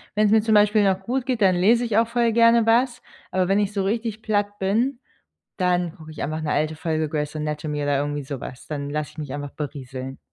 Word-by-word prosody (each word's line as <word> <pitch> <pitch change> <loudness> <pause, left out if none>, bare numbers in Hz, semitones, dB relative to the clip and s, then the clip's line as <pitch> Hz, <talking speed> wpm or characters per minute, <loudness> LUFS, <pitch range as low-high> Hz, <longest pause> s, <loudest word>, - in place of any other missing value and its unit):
wenn's 210 0 +3
mir 220 0 +5
zum 220 0 +1
Beispiel 210 0 +5
noch 190 -1 +2
gut 245 +5 -2
geht, 255 -4 -1
dann 190 -2 +5
lese 230 +7 +3
ich 220 -2 0
auch 230 0 +4
voll 235 -1 +1
gerne 230 0 +5
was, 240 +2 +2 0.3
aber 185 -1 +1
wenn 195 +2 +3
ich 205 0 0
so 195 - 0
richtig 220 +2 -2
platt 205 -2 -1
bin, 235 +7 0 0.6
dann 180 -2 +1
gucke 155 -1 -12
ich 155 - -7
einfach 155 +2 -3
'ne 155 - -2
alte 155 +1 0
Folge 160 -1 -1
Grey's 150 0 -3
Anatomy 150 -1 -3
oder 145 -1 +1
irgendwie 145 0 -2
sowas. 130 -2 -7
Dann 140 -2 -4
lasse 150 0 -3
ich - - -24
mich 145 -4 -5
einfach 145 -1 -5
berieseln. 135 -3 -6
185 Hz, 225 wpm, -23 LUFS, 150-220 Hz, 0.6 s, mir